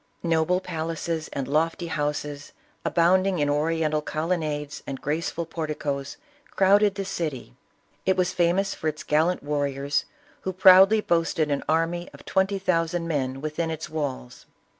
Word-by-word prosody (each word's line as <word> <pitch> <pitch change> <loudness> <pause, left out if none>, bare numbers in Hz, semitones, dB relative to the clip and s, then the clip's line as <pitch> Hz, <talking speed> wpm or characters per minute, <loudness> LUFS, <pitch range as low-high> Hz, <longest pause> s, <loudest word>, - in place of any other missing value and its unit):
No 165 -2 +2
ble 180 +2 +2
palaces 165 -2 -3
and 135 -2 -3
lofty 165 +4 0
houses, 145 -2 -3 0.3
abounding 185 +2 +3
in 145 -2 +1
Oriental 155 0 +1
colonnades 155 -2 -2
and 135 -1 -4
graceful 165 +3 -2
porticoes, 150 -4 -4 0.3
crowded 200 +1 +4
the 195 0 -3
city. 155 - -4 0.5
It 190 0 +2
was 180 0 +1
famous 180 +3 +1
for 160 - -4
its 155 0 -3
gallant 160 +3 +1
warriors, 140 -1 -1 0.3
who 190 - -4
proudly 190 +3 +7
boasted 165 -4 +1
an 140 - 0
army 165 +2 0
of - - -15
twenty 195 +1 +1
thousand 170 -2 0
men 135 -4 -2
within 155 +2 -2
its 160 0 -5
walls. 135 -5 -5
160 Hz, 140 wpm, -25 LUFS, 150-180 Hz, 0.5 s, proudly